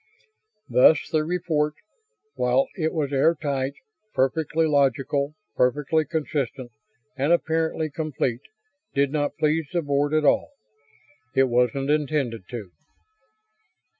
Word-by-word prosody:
Thus 140 +4 +5
the 155 -1 +2
report, 155 -3 -1 0.6
while 125 +2 +1
it 160 -4 -1
was 145 -3 -2
air 155 +5 +4
tight, 140 -3 -2 0.4
perfectly 155 +4 +1
logical, 140 0 +1 0.2
perfectly 150 +5 +2
consistent, 140 -6 -3 0.4
and 140 +4 0
apparently 160 -2 +1
complete, 140 -6 -2 0.5
did 140 0 +2
not 145 -1 -1
please 155 0 +1
the 175 -2 0
Board 145 +1 +1
at 155 -1 +2
all. - - +3 0.9
It 135 -1 +4
wasn't 125 +3 +1
intended 140 -9 -1
to. 110 -7 -7
145 Hz, 110 wpm, -24 LUFS, 135-155 Hz, 0.9 s, Thus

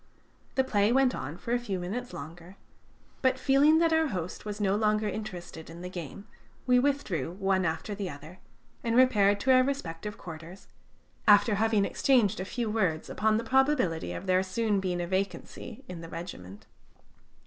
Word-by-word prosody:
The 265 - +3
play 210 -4 +2
went 260 0 +3
on 145 +5 -5
for 235 - -6
a 245 - +2
few 210 -6 -3
minutes 230 +8 -4
longer, 170 +5 -9 0.7
but 260 -1 +2
feeling 275 +4 +4
that 330 0 +3
our 320 0 +3
host 180 - -5
was 210 0 -5
no 200 -1 +2
longer 215 0 +1
interested 180 -6 -6
in 170 +1 -10
the 180 - -6
game, 180 +3 -7 0.4
we 250 -1 +5
withdrew 260 - -1
one 190 -1 +1
after 160 +5 -2
the 200 -2 -4
other, 155 +5 -11 0.4
and 230 -1 0
repaired 205 -6 +4
to 265 - +3
our 255 0 +7
respective 210 -8 -3
quarters, 165 +2 -10 0.6
after 205 +1 +6
having 215 -1 +2
exchanged 220 -7 +2
a 185 - -3
few 235 +3 -3
words 190 -8 -1
upon 215 0 +2
the 230 - -2
probability 255 - +1
of 85 - -6
there 185 0 +3
soon 205 +2 0
being 180 -2 -2
a - - -2
vacancy 190 +5 -4
in 180 -2 -7
the 165 - -9
regiment. 105 - -8
200 Hz, 175 wpm, -29 LUFS, 175-240 Hz, 0.7 s, our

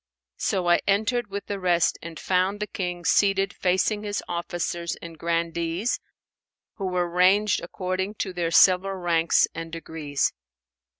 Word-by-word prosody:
So 185 -2 0
I 175 - +5
entered 215 +3 +1
with 200 +1 -5
the 200 -1 -4
rest 175 -2 +2
and 165 -1 -8
found 185 +2 +1
the 210 - -1
King 180 -4 -5
seated 195 +2 +3
facing 190 +3 +1
his 205 -1 -3
officers 170 0 -3
and 170 -1 -9
grandees 170 +4 -1 0.8
who 195 - -3
were 180 -1 0
ranged 185 +4 +3
according 190 +2 -3
to 190 -2 -3
their 175 -2 -1
several 185 +3 +5
ranks 170 -2 +2
and 165 0 -6
degrees. 160 -3 -2
180 Hz, 140 wpm, -25 LUFS, 170-195 Hz, 0.8 s, I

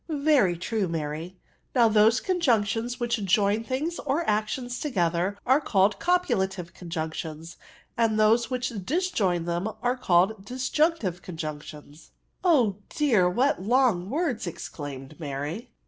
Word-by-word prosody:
*' - - -40 0.2
Very 190 - +3
true, 205 +2 -1
Mary, 165 +2 -4 0.4
Now 240 -2 +6
those 220 +2 +4
conjunc 290 - +2
tions 235 +4 -3
which 235 -3 -1
join 200 +3 +2
things 290 +8 -3
or 300 +4 -1
actions 245 +4 -1
together 180 - 0
are 265 +4 +4
called 200 -5 +2
copulative 190 - 0
conjunctions; 160 -1 -6 0.4
and 225 -2 +1
those 225 +2 +4
which 255 -1 -2
disjoin 205 - 0
them 175 +4 -1
are 245 +1 +2
called 195 -3 +2
disjunctive 255 - 0
conjunctions^^* 155 -2 -8
tONJUNCTIONS. - - -38 0.3
99 325 -8 +5
u 205 -4 -1
Oh - - -24
dear^ 225 -12 +2
what 255 +3 +1
long 220 -4 +2
words!*' 280 - -1
exclajmed 145 -3 -7
Mary. 150 - -5
210 Hz, 140 wpm, -26 LUFS, 175-250 Hz, 0.4 s, Now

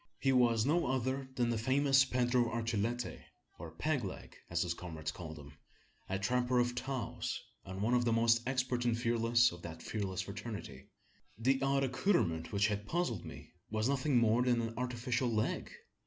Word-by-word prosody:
He 135 - +2
was 120 -3 +4
no 165 +3 +2
other 130 +1 -1
than 120 -2 +1
the 115 - -1
famous 135 +3 +4
Pedro 125 -1 +2
Archilete 115 +1 -2 0.4
or 85 0 -7
"Peg 130 - -1
leg," 95 - -7
as 85 0 +1
his 85 -1 -1
comrades 80 -3 -5
called 80 -3 -8
him 70 -1 -11 0.6
a 95 - 0
trapper 125 +5 +1
of 120 0 +2
Taos, 130 -1 -3 0.3
and 95 +1 -5
one 115 +3 +2
of 125 0 +3
the 120 - +1
most 115 0 +4
expert 130 -2 0
and 120 -1 +1
fearless 120 0 +3
of 85 0 -10
that 80 -1 -8
fearless 95 -4 -2
fraternity. 105 - -7 0.5
The 130 +4 +2
odd 135 0 +2
accoutrement 125 - +1
which 100 0 +2
had 105 0 -1
puzzled 165 - -1
me - - -10 0.2
was 110 +1 0
nothing 140 0 +2
more 115 0 +4
than 125 -1 +2
an 115 0 -3
artificial 125 0 -1
leg! 110 -1 -1
120 Hz, 175 wpm, -34 LUFS, 105-130 Hz, 0.6 s, was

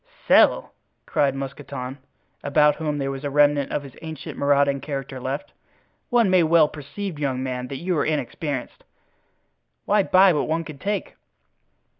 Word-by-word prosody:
"Sell!" - - +4 0.3
cried 140 -2 +1
Mousqueton, 135 -1 -6 0.4
about 150 +1 +3
whom 150 -1 -2
there 135 -1 -2
was 135 +1 -7
a 145 - -2
remnant 145 0 +3
of 145 - -2
his 135 -3 -12
ancient 160 -3 -7
marauding 140 -1 +2
character 135 -2 -5
left. 130 +3 -5 0.6
"One 240 -3 +3
may 185 -1 +4
well 160 -1 +5
perceive, 155 +4 -7
young 130 -3 -1
man, 125 -1 -4
that 135 - -6
you 180 0 0
are - - +2
inexperienced. 145 -2 -3 1.0
Why 210 - +3
buy 190 -1 +5
what 150 - -1
one 165 +1 -1
can 155 -4 -10
take?" 200 +1 -3
145 Hz, 155 wpm, -23 LUFS, 135-160 Hz, 1.0 s, well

